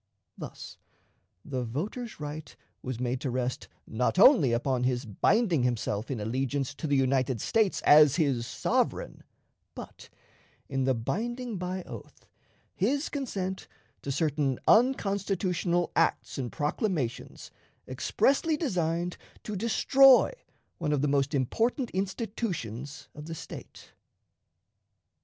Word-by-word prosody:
Thus, - - -9 0.7
the 130 -3 -3
voter's 195 - -5
right 150 +1 -7 0.3
was 130 -2 -5
made 125 0 -2
to 135 - -2
rest, 125 0 -2 0.2
not 125 +9 -1
only 195 - +7
upon 125 +1 0
his 125 0 0
binding 170 - +2
himself 115 -3 -1
in 130 -5 -3
allegiance 135 +5 -2
to 155 - -5
the 145 - +2
United 130 -2 +1
States 215 - +1
as 150 -1 +7
his 135 -8 0
sovereign, 125 - -1 0.5
but - - -10 0.6
in 135 -1 -1
the 130 -1 +2
binding 230 - -3
by 180 +1 -3
oath - - -11 0.5
his 275 - 0
consent 195 -9 -4 0.3
to 140 - -4
certain 145 -2 0
unconstitutional 195 -7 +2
acts - - +1
and 125 -3 -3
proclamations 150 - -3 0.4
expressly 305 +3 +1
designed 175 - -1 0.3
to 210 - -5
destroy 260 - +5 0.5
one 150 -3 0
of 145 -1 0
the - - +3
most 140 +1 +1
important 230 - 0
institutions 185 - -4
of 150 0 -10
the 165 - -5
State. - - -10
150 Hz, 120 wpm, -28 LUFS, 130-200 Hz, 0.7 s, only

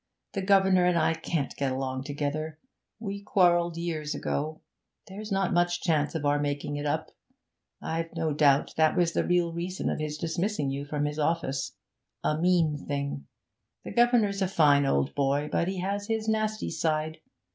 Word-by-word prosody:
The 195 - -1
governor 190 -1 +4
and 180 -1 +3
I 160 0 +3
can't 165 -3 -3
get 140 -2 0
along 130 0 -3
together; 150 +2 -3 0.4
we 200 -2 -5
quarrelled 175 -4 +3
years 160 -3 -3
ago, 155 +2 -3 0.5
there's 210 +2 -8
not 195 -1 +1
much 175 0 +2
chance 155 -3 +1
of 155 -2 -2
our 145 0 +3
making 145 0 -2
it 145 0 -2
up. 145 - -2 0.7
I've 165 +1 -2
no 160 -2 0
doubt 145 -1 +3
that 160 +2 +3
was 170 -2 +2
the - - +1
real 175 -1 +1
reason 175 +2 -2
of - - -3
his 150 -1 -3
dismissing 165 -2 -1
you 140 +1 -4
from 145 0 -1
his 150 +1 -3
office 150 -3 -1 0.5
a 150 - +1
mean 165 -3 +2
thing! 140 - -3 0.6
The - - -7
governor's 235 -5 +3
a 190 - +2
fine 145 -6 +4
old 70 - +1
boy, 140 +1 0
but 170 - +1
he 190 -1 -2
has 200 +2 -2
his 220 -1 -1
nasty 215 0 0
side. 155 0 -1
160 Hz, 175 wpm, -28 LUFS, 145-185 Hz, 0.7 s, governor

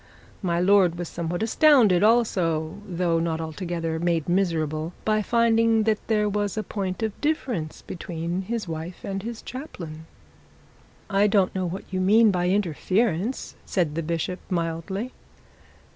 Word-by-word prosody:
My 170 -3 0
lord 180 -2 +4
was 175 -1 -4
somewhat 170 +3 -3
astounded 230 - +5
also, 190 -7 +2
though 175 -2 0
not 165 -1 -1
altogether 165 0 -3
made 170 -2 0
miserable, 165 -3 0
by 215 0 +2
finding 230 0 +3
that 215 -1 +1
there 210 -2 +2
was 205 0 -1
a 215 - 0
point 195 -1 -3
of 220 -2 -3
difference 250 - -2
between 170 +1 -4
his 220 +1 -3
wife 165 +2 -6
and 195 0 -3
his 230 +2 -6
chaplain. 165 - -8 1.0
'I 200 +1 +4
don't 200 -2 +2
know 185 -1 -1
what 180 +3 -5
you 185 - 0
mean 215 +3 +5
by 180 -1 0
interference,' 195 - 0
said 170 -6 0
the 165 - -2
bishop 170 +3 -2
mildly. 180 +6 -2
185 Hz, 145 wpm, -25 LUFS, 165-215 Hz, 1.0 s, astounded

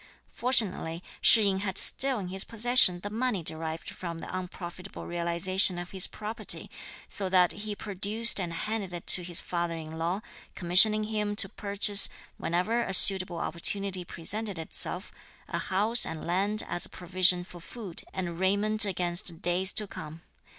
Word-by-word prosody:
Fortunately 195 -9 -2 0.2
Shih 225 - +5
yin 195 -2 -1
had 190 -1 -5
still 270 -1 +3
in 190 -4 -7
his 190 +1 0
possession 230 -6 +5
the 205 - -8
money 225 -5 -4
derived 160 +1 -5
from 170 -2 -8
the 180 - -9
unprofitable 180 0 -10
realization 175 +2 +2
of 175 0 -9
his 190 -2 -1
property, 215 +2 -2 0.4
so 195 -2 -5
that 180 -1 +1
he 205 +4 -6
produced 210 +3 +1
and 175 -3 -5
handed 200 +2 -6
it 175 - -9
to 180 - +3
his 175 0 -3
father 170 -1 -5
in 160 0 -10
law, 175 +5 -4 0.3
commissioning 195 +5 +4
him 210 -1 -4
to 195 - +2
purchase, 200 +1 +2 0.3
whenever 185 +8 -3
a 190 -4 0
suitable 185 -2 +6
opportunity 185 +2 -1
presented 200 +4 -6
itself, 160 - -3 0.4
a - - -5
house 215 +5 -1
and 160 - -3
land 200 +5 -1
as 175 - 0
a - - +3
provision 180 0 +1
for 175 -1 -14
food 185 0 -9
and 175 -3 -7
raiment 205 +3 +5
against 175 -2 0
days 180 +2 +1
to 215 - 0
come. 160 -4 -12
190 Hz, 160 wpm, -26 LUFS, 175-210 Hz, 0.4 s, suitable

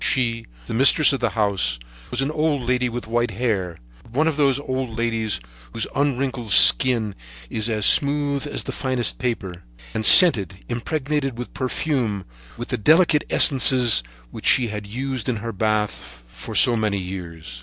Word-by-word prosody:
She, 115 -3 -1 0.2
the - - -7
mistress 140 +5 +4
of 135 - -3
the 120 - -1
house, 95 - 0 0.3
was 130 +2 -2
an 140 - -3
old 150 -3 -1
lady 125 0 -1
with 120 +1 -6
white 120 +1 -1
hair, 100 -6 -3 0.2
but - - -21
one 155 +5 +1
of 160 - -1
those 140 -2 +1
old 130 -4 -5
ladies 115 - -2 0.3
whose - - -2
unwrinkled 135 -4 -2
skin 110 +1 +5 0.4
is 110 +1 -2
as 105 -3 0
smooth 145 0 +1
as - - -3
the - - -6
finest 130 -3 -3
paper, 95 -8 -5 0.3
and 110 - -3
scented, 100 - +6
impregnated 135 +2 -3
with 125 - -8
perfume, 125 - -3 0.3
with 120 - -8
the 125 - -1
delicate 155 - +3
essences 125 - +5 0.3
which - - -7
she 120 -3 +2
had 105 -1 -7
used 130 +3 -5
in 125 - -1
her 115 +2 -6
bath 105 - -3
for - - -10
so 125 -2 +3
many 105 -3 -1
years. 85 -9 -8
120 Hz, 165 wpm, -21 LUFS, 105-135 Hz, 0.4 s, scented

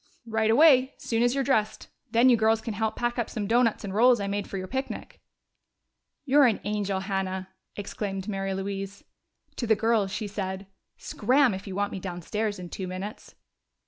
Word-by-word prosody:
"Right 220 -1 0
away, 265 +1 +5
soon 230 -1 -1
as 245 +2 +3
you're 275 - +1
dressed. 220 -5 0 0.2
Then 235 +3 +4
you 250 - +7
girls 220 0 +3
can 220 0 -5
help 220 +1 -1
pack 240 0 -1
up 235 - -1
some 215 -3 -3
doughnuts 230 +1 +2
and 195 -2 -5
rolls 240 +3 +5
I 200 - -2
made 200 +1 -3
for 195 - -4
your 185 - -4
picnic." 265 +5 -5 1.0
"You're 280 0 +6
an 225 - +1
angel, 200 -2 -1
Hannah!" 190 -1 -3 0.3
exclaimed 195 -1 -4
Mary 195 -2 -2
Louise. 195 0 -5 0.5
To 235 - -2
the 220 - +5
girls 220 -2 +1
she 215 - -3
said, 195 -1 -4 0.3
"Scram, 255 +2 +2
if 190 +2 -7
you 190 - -5
want 205 +1 -1
me 195 - -5
downstairs 200 +4 -3
in 180 -1 -8
two 190 +1 -5
minutes." 185 +3 -7
210 Hz, 185 wpm, -27 LUFS, 195-235 Hz, 1.0 s, you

